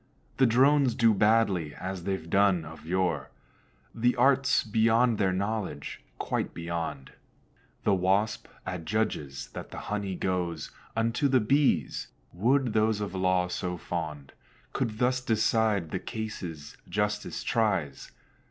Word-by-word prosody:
The 130 - +5
Drones 135 +1 +4
do 115 -2 +4
badly, 100 -7 +2
as 95 -1 -5
they've 95 -5 -2
done 95 -2 +3
of 80 +1 -11
yore; 95 0 0 0.6
The 120 +2 +2
art's 135 +1 +3
beyond 115 +1 +3
their 95 -2 +3
knowledge, 95 -6 -3
quite - - -2
beyond. 85 -5 -4 0.7
The 100 - +3
Wasp 95 +4 +1 0.2
adjudges 85 -6 -2
that - - -8
the - - -9 0.2
honey 100 -2 -2
goes 90 -4 -2 0.2
Unto 115 +5 +1
the 130 -1 +4
Bees: 135 +6 +1 0.3
would 125 +5 +2
those 110 -1 +2
of 100 -3 -4
law 95 -1 +2
so 90 0 -3
fond 80 -5 -5 0.4
Could 110 -2 -2
thus 125 +1 +1
decide 110 -6 +1
the - - -1
cases 90 -9 -6
justice - - -2
tries. 95 - 0
100 Hz, 125 wpm, -28 LUFS, 90-115 Hz, 0.7 s, The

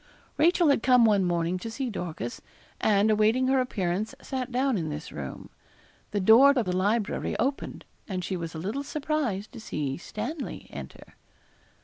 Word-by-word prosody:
Rachel 340 0 +4
had 280 - +3
come 250 -2 +5
one 205 -3 +4
morning 175 0 0
to 225 - -5
see 250 +2 -3
Dorcas, 160 - -5 0.4
and, 210 0 +3
awaiting 220 +5 +3
her 265 0 +4
appearance, 205 -1 -2
sat 260 -2 -4
down 260 +1 +1
in 165 -5 -2
this 150 +1 -6
room. 70 -2 -7 0.6
The 205 - -1
door 225 +8 +7
of 245 -5 +1
the 180 0 -1
library 205 +3 0
opened, 275 +2 -2 0.2
and 185 -3 -3
she 190 - -2
was 165 -2 -5
a - - -4
little 205 - -3
surprised 280 -9 -2
to 240 - -9
see 145 -10 -3
Stanley 280 - -5
enter. - - -10
215 Hz, 165 wpm, -27 LUFS, 180-260 Hz, 0.6 s, door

